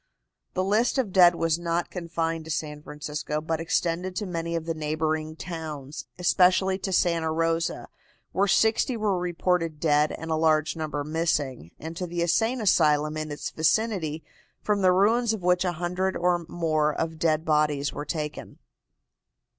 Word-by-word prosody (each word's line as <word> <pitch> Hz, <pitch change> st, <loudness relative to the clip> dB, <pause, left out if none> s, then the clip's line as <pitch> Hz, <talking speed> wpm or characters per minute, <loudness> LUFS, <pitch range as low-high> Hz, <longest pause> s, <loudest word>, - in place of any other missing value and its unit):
The 185 Hz, -, +1 dB
list 215 Hz, +7 st, +2 dB
of 225 Hz, -8 st, -1 dB
dead 175 Hz, -2 st, +7 dB
was 165 Hz, -1 st, 0 dB
not 170 Hz, 0 st, -2 dB
confined 165 Hz, -2 st, -3 dB
to -, -, -10 dB
San 150 Hz, 0 st, -3 dB
Francisco, 150 Hz, 0 st, -4 dB
but 160 Hz, +1 st, -2 dB
extended 175 Hz, +1 st, -1 dB
to 210 Hz, -, -2 dB
many 170 Hz, -2 st, -3 dB
of 165 Hz, -1 st, -3 dB
the 165 Hz, -, -1 dB
neighboring 155 Hz, 0 st, -2 dB
towns, 155 Hz, -5 st, -7 dB
especially 185 Hz, +2 st, +3 dB
to 190 Hz, -, -3 dB
Santa 170 Hz, -3 st, +1 dB
Rosa, 165 Hz, +1 st, -1 dB, 0.4 s
where 200 Hz, +2 st, +1 dB
sixty 225 Hz, +5 st, +2 dB
were 205 Hz, -4 st, 0 dB
reported 175 Hz, -2 st, -1 dB
dead 150 Hz, -1 st, +3 dB
and 160 Hz, 0 st, -6 dB
a -, -, +2 dB
large 155 Hz, 0 st, +2 dB
number 155 Hz, -2 st, -3 dB
missing, 150 Hz, -, -1 dB
and 160 Hz, +2 st, -7 dB
to 180 Hz, -, -3 dB
the 170 Hz, 0 st, -2 dB
insane 225 Hz, +9 st, +1 dB
asylum 155 Hz, -6 st, +3 dB
in 155 Hz, 0 st, -4 dB
its 145 Hz, -, -5 dB
vicinity, 160 Hz, -3 st, 0 dB, 0.4 s
from 205 Hz, -1 st, +1 dB
the 185 Hz, -1 st, +5 dB
ruins 220 Hz, +5 st, +3 dB
of 210 Hz, -5 st, -5 dB
which 180 Hz, 0 st, +3 dB
a 180 Hz, -2 st, 0 dB
hundred 180 Hz, +3 st, -2 dB
or 175 Hz, -1 st, 0 dB
more 155 Hz, -3 st, +1 dB
of 160 Hz, -1 st, -3 dB
dead 160 Hz, -1 st, +1 dB
bodies 150 Hz, -2 st, +1 dB
were 145 Hz, -, -4 dB
taken. 150 Hz, -1 st, -5 dB
165 Hz, 165 wpm, -26 LUFS, 155-180 Hz, 0.4 s, dead